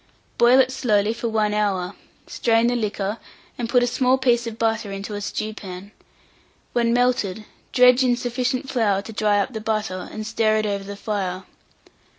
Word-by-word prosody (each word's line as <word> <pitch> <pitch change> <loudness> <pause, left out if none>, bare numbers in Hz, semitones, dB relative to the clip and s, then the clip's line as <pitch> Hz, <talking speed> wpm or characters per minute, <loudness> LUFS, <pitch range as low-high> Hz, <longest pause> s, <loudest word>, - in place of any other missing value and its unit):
Boil 245 +2 +6
it 260 -1 +4
slowly 215 -4 +1
for 235 0 -3
1 215 -1 +1
hour, 200 -3 0 0.3
strain 230 -1 +1
the 245 +1 +2
liquor, 210 -1 -2 0.4
and 235 -2 -4
put 245 0 +4
a - - +4
small 255 +1 +2
piece 240 -2 +2
of 225 -1 -6
butter 225 -3 -1
into 195 +2 -6
a 205 - -4
stewpan; 205 -2 -6 0.8
when 235 -1 +2
melted, 235 -4 +1 0.3
dredge 250 0 +6
in 245 -1 +2
sufficient 250 +2 -2
flour 205 -7 +1
to 225 - -9
dry 210 -1 +2
up 205 +6 -1
the 220 - -5
butter, 215 -4 -2
and 215 0 -6
stir 220 0 +1
it 215 - 0
over 200 -1 -2
the 200 +1 -7
fire. 195 -3 -3
220 Hz, 175 wpm, -22 LUFS, 205-245 Hz, 0.8 s, Boil